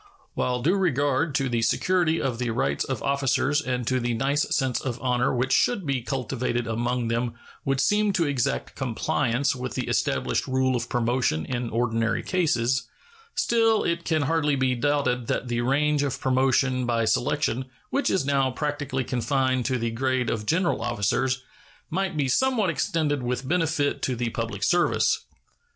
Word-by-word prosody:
While 125 -1 -1
due 175 +8 +3
regard 145 -4 +1
to 135 -3 +1
the 120 -2 0
security 165 +7 +2
of 125 -4 -2
the 125 -1 -1
rights 70 - 0
of - - -4
officers 140 +1 +1
and 125 -4 -2
to 130 +2 +1
the 120 -1 -1
nice 140 +5 0
sense 130 -3 0
of 125 -2 -4
honor 125 0 +1
which 130 +1 0
should 200 - +2
be 135 -3 0
cultivated 125 -1 -2
among 120 +1 -1
them 115 0 -1 0.3
would 135 -1 +1
seem 210 +9 +3
to 170 -3 +2
exact 140 -2 -1
compliance 130 +2 0
with 125 -2 -5
the - - -2
established - - 0
rule 130 0 +1
of 120 0 -3
promotion 120 -9 0
in 120 -2 -3
ordinary 115 -1 0
cases, 130 -8 +1 0.5
still 225 -2 +3
it 170 0 -1
can 155 -3 +1
hardly 150 -1 +1
be 130 -1 +1
doubted 125 -2 0
that 125 - -2
the 120 0 0
range 145 +4 +2
of 140 -3 -2
promotion 130 -1 +2
by 115 -1 +1
selection, 130 +1 0 0.3
which 280 - +1
is 185 - +1
now 135 -2 +2
practically 145 -1 -2
confined 130 0 0
to 130 -1 0
the 115 -1 -2
grade 130 +1 0
of 105 -2 -3
general 170 +2 +1
officers, 125 +4 0 0.5
might 190 -1 -1
be 140 -2 +1
somewhat 225 - +2
extended 150 -2 0
with 125 +1 -3
benefit 160 -3 0
to 130 - -1
the 120 -1 -2
public 115 -3 -4
service. 175 +8 +2
130 Hz, 170 wpm, -25 LUFS, 120-145 Hz, 0.5 s, due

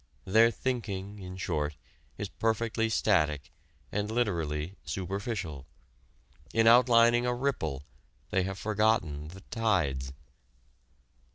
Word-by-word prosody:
Their 110 +4 +5
thinking, 105 -6 -3
in 90 -1 -8
short, 75 -4 -2 0.4
is - - -3
perfectly 115 0 0
static 75 -10 +1 0.4
and 105 +1 -1
literally 85 -8 -1
superficial. 95 - -4 0.9
In 115 0 +4
outlining 120 0 +6
a 125 - +1
ripple 80 - -2 0.5
they 95 -3 +2
have 95 +1 -3
forgotten 105 -9 +1
the 95 +4 -11
tides. 80 - 0
100 Hz, 100 wpm, -29 LUFS, 80-115 Hz, 0.9 s, outlining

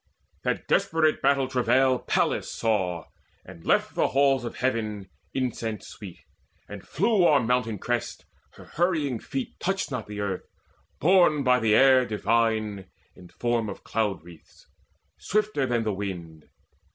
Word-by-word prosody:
That - - -2
desperate 155 -1 +2
battle 140 -2 +2
travail 130 0 +2
Pallas - - 0
saw, 95 -7 -1 0.4
And 80 - -13
left - - +1
the - - +1
halls 135 -1 +2
of 120 - -6
Heaven 110 -5 -2 0.2
incense 120 -4 -3
sweet, 95 -5 -10 0.5
And 105 -1 -8
flew 200 - +1
o'er 145 -2 +5
mountain 120 -2 0
crests: 120 +4 -3 0.3
her - - -14
hurrying 155 -8 -1
feet 135 +3 -6
Touched 195 -3 -2
not 125 -4 -4
the 105 0 -7
earth, 100 -3 -3 0.5
borne 165 -3 +4
by 125 -1 +4
the 110 -2 +3
air 130 0 +6
divine 110 -2 0 0.3
In 90 - -14
form 120 +1 -1
of 100 - -8
cloud 105 -6 -2
wreaths, 85 -1 -17 0.5
swifter 210 -9 0
than 120 -2 0
the 110 -2 -1
wind. 85 -6 -6
120 Hz, 140 wpm, -26 LUFS, 105-135 Hz, 0.5 s, air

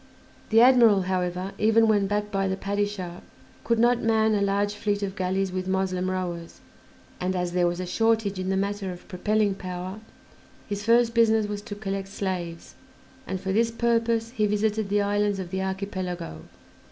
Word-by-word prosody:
The 225 +1 +6
admiral, 235 -6 +6
however, 180 0 -2
even 225 +1 +4
when 205 -2 +3
backed 210 +1 -1
by 195 -1 0
the 190 0 -1
Padishah, 200 -3 -3 0.4
could 230 0 +1
not 240 +1 +3
man 220 -1 +2
a 205 - +1
large 200 +1 +1
fleet 205 -1 -1
of 195 -1 -3
galleys 190 0 -1
with 185 0 -3
Moslem 185 -1 0
rowers, 175 -3 -4 0.6
and, 185 +1 -1
as 180 -1 -1
there 175 0 +2
was 175 +1 -2
a 185 - -3
shortage 220 0 +1
in 185 0 -2
the 190 - +1
matter 200 -1 -2
of 180 0 -11
propelling 210 +2 +1
power, 185 +1 -6 0.7
his 205 -1 -4
first 230 0 +4
business 225 -2 +4
was 205 0 -4
to 205 -1 -7
collect 195 -1 -4
slaves, 180 -4 -4 0.5
and 190 - -3
for 190 +1 -2
this 230 +2 +3
purpose 230 0 0
he 215 -4 +1
visited 210 0 0
the 205 0 +2
islands 205 0 +1
of 185 -2 -6
the 190 0 -2
Archipelago. 185 - -4
200 Hz, 175 wpm, -26 LUFS, 185-215 Hz, 0.7 s, The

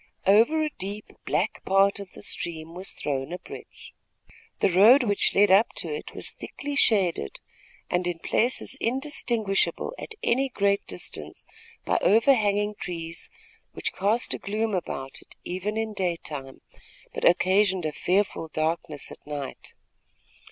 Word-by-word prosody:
Over 230 +11 +5
a 305 - -1
deep, 200 +3 -4 0.2
black - - -1
part 195 +1 +3
of 200 -2 -9
the - - -10
stream 165 -1 -3
was 185 +2 -6
thrown 135 0 -3
a 180 - -3
bridge. - - -12 0.6
The 195 - +2
road 220 +10 +7
which 205 -4 +1
led 205 0 +5
up 200 +4 +5
to - - -3
it 450 - -7
was - - -2
thickly 290 0 -7
shaded, 190 - +2 0.5
and 180 0 0
in 175 -1 -2
places 240 +10 0
indistinguishable 235 - 0
at 450 - -7
any 265 +3 +2
great 200 -4 +1
distance 90 - -4 0.4
by - - +2
overhanging 210 -2 +3
trees, 165 -1 -5 0.4
which - - -3
cast 210 +5 0
a - - -4
gloom 215 +2 -2
about 135 -7 -4
it, - - -18
even 190 +4 -3
in 220 -1 -2
daytime, 160 -8 -4 0.5
but - - -5
occasioned 185 0 +3
a 155 - 0
fearful 185 +2 0
darkness 155 -1 -2
at - - -12
night. 145 -2 -6
195 Hz, 145 wpm, -26 LUFS, 170-220 Hz, 0.6 s, road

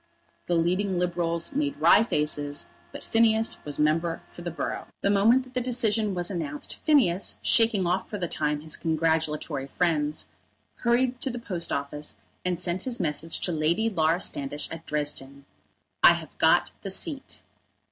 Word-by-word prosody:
The 175 - +1
leading 180 +3 +1
Liberals 170 0 -1
made 285 0 -1
wry - - +6
faces, 150 -6 -1 0.3
but - - -9
Phineas 225 0 +2
was 145 -1 -5
member 165 +2 +1
for - - -12
the 175 - -4
borough. 170 - -4
The 200 - +2
moment 225 +6 +4
that 255 0 -17
the 250 - 0
decision 225 -4 0
was 175 +2 -2
announced, 150 -5 -4
Phineas, 235 - +3
shaking 225 -5 +4
off 180 +2 -1
for 210 - -4
the 180 -3 -2
time 150 -2 -1
his 155 0 -2
congratulatory 160 -3 -1
friends, 150 -1 -1 0.5
hurried 245 +1 +1
to 270 - 0
the 245 - -5
post 185 -8 -3
office 145 +1 -3 0.3
and 180 -2 -1
sent 180 +1 -1
his 250 -2 -3
message 165 -1 -1
to 180 - 0
Lady 170 +8 +1
Laura 165 -2 +2
Standish 145 -3 -1
at 165 0 -8
Dresden: 140 -2 -3 0.6
"I - - +9
have - - -9
got - - +4
the - - -5
seat." - - -1
175 Hz, 165 wpm, -26 LUFS, 155-220 Hz, 0.6 s, I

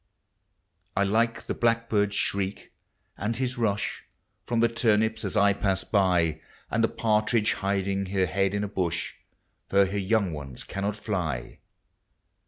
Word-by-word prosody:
1 100 0 +1
like 115 +1 +1
the - - -2
blackbird's 115 -3 +1
shriek, 100 -1 -2 0.5
and 110 +2 -1
his 130 -1 -1
rush 105 -3 -1 0.4
From 120 -1 0
the 115 - +5
turnips 110 -1 +1
as - - -2
I 100 -1 +5
pass 95 -1 0
by. 90 -6 +2 0.3
And 115 - +1
the - - +5
partridge 110 0 +1
hiding 100 0 -1
her 95 0 +1
head 95 +3 0
in 100 - 0
a - - -1
bush. 90 -4 -2 0.6
For 100 0 +5
her 100 +2 -2
young 100 -2 +1
ones 70 -4 -7
cannot 100 +1 -3
fly. 85 - -3
100 Hz, 145 wpm, -27 LUFS, 95-110 Hz, 0.6 s, the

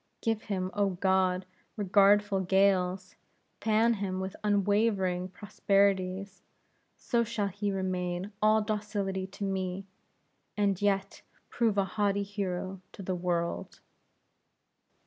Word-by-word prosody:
Give 225 -2 0
him, 185 -4 -3
O 205 -1 +2
God, 190 -1 +2 0.3
regardful 205 0 +4
gales! 190 0 +2 0.5
Fan 220 +2 +3
him 195 -3 -3
with 190 0 -4
unwavering 200 -3 +1
prosperities! 195 -1 0 0.6
So 235 -2 +1
shall 215 -3 -2
he 205 +2 -2
remain 185 0 -2
all 215 0 +4
docility 205 -3 -2
to 200 +1 -8
me, 190 -1 -2 0.7
and 200 -2 +1
yet 195 -1 0 0.3
prove 225 -4 +1
a 195 - +3
haughty 200 +1 0
hero 190 -2 -4
to 195 - -9
the 185 - -2
world!" 175 -1 -2
195 Hz, 110 wpm, -30 LUFS, 185-205 Hz, 0.7 s, regardful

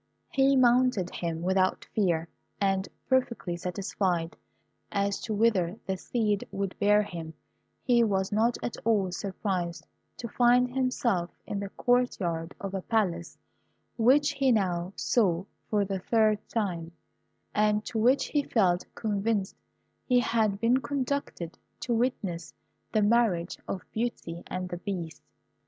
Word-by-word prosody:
He 275 0 +4
mounted 245 -7 +3
him 165 -1 -3
without 185 +1 +1
fear, 170 -6 +1 0.3
and, 195 -1 +1 0.2
perfectly 250 -9 0
satisfied 180 -1 -2 0.6
as 200 0 0
to 220 - -3
whither 205 -4 +2
the 190 - -1
steed 210 +1 -1
would 195 -1 -3
bear 210 +1 +4
him, 165 -5 -7 0.5
he 240 -2 +4
was 190 -3 0
not 225 +3 +2
at - - -3
all 205 -5 +2
surprised 185 -3 -3 0.3
to 235 - -5
find 245 +2 +3
himself 245 -9 0 0.2
in 200 - -3
the 200 -1 -4
court 245 +3 +1
yard 165 -2 -3
of 195 -1 -5
a 195 - -2
Palace 180 -6 -1 0.6
which 275 +5 +4
he 275 -2 +2
now 180 -5 +1
saw 190 -6 +1 0.2
for 205 -2 +2
the 195 -1 -3
third 215 +1 +2
time, 175 -7 -2 0.6
and 210 0 +2
to 225 - -2
which 250 +5 +3
he 295 - +2
felt 185 -9 +2
convinced 205 -2 -1 0.5
he 250 -2 +5
had 220 -4 +1
been 230 +3 +3
conducted 270 - -3 0.2
to 240 - -1
witness 200 -9 -2 0.4
the 215 - +2
marriage 205 -6 +2
of 190 - -4
Beauty 220 -7 -3
and 185 0 -4
the 175 - -4
Beast. 175 -4 -5
205 Hz, 140 wpm, -28 LUFS, 180-235 Hz, 0.6 s, he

